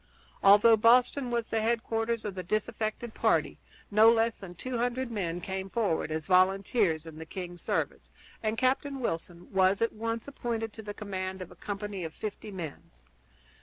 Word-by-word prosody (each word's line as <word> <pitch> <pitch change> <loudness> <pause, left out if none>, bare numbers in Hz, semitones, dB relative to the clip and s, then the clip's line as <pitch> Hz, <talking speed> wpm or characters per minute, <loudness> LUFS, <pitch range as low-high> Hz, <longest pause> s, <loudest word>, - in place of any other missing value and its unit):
Although 210 +3 +7
Boston 245 +4 +4
was 235 -1 -1
the 225 - 0
headquarters 225 0 0
of 205 - -3
the 185 - -4
disaffected 215 +3 -2
party, - - +1 0.3
no 215 +2 +7
less 230 0 +2
than 180 -3 -9
two 250 +6 -4
hundred 245 +1 -1
men 175 -6 -2
came 190 +1 -4
forward 195 -8 0
as 155 0 -3
volunteers 185 -2 +3
in 160 -1 -10
the 160 - -7
king's 175 -1 -7
service, - - -2 0.3
and 220 0 -1
Captain 270 +2 +1
Wilson 175 -6 -4
was 190 +1 +4
at 230 - +1
once 230 +2 -3
appointed 230 -5 -3
to 220 - -8
the 205 -1 -7
command 190 -2 -4
of 185 - -8
a - - -13
company 205 -2 -5
of 160 -1 -6
fifty 215 0 -6
men. 170 -7 -7
215 Hz, 170 wpm, -29 LUFS, 185-230 Hz, 0.3 s, Although